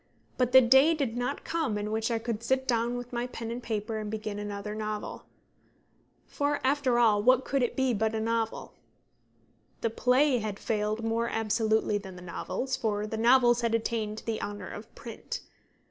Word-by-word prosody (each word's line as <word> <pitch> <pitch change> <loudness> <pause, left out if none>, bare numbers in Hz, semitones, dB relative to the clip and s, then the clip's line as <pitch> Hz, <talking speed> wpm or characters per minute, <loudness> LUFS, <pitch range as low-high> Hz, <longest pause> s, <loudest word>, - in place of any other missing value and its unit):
But 250 -1 +1
the 260 - +9
day 265 +6 +6
did 270 -7 -2
not 245 +3 -2
come 320 -11 -1
in 210 +1 -3
which 220 +1 0
I 230 - +1
could 225 -1 -3
sit 260 +2 0
down 235 0 +1
with 245 0 -7
pen 240 -1 -4
and 240 +1 -4
paper 220 -1 -3
and 210 -1 -4
begin 215 -1 -4
another 205 0 -5
novel. 215 -1 -5 1.0
For, 290 0 -1
after 265 -2 +2
all, 220 -4 +4
what 255 +3 +4
could 275 -1 0
it 245 - 0
be 260 -2 +2
but 220 +1 0
a - - 0
novel? 225 0 -2 1.1
The 230 - 0
play 255 +3 +3
had 210 -2 -4
failed 215 0 -1
more 230 +1 0
absolutely 220 -1 +1
than 190 -2 -10
the 180 - -10
novels, 185 +8 -3
for 210 -2 -1
the 215 - -4
novels 240 +1 +5
had 230 -1 +1
attained 220 -1 -2
the 225 -1 -2
honour 205 -2 -5
of 210 +1 -9
print. 230 - -7
230 Hz, 180 wpm, -29 LUFS, 215-245 Hz, 1.1 s, the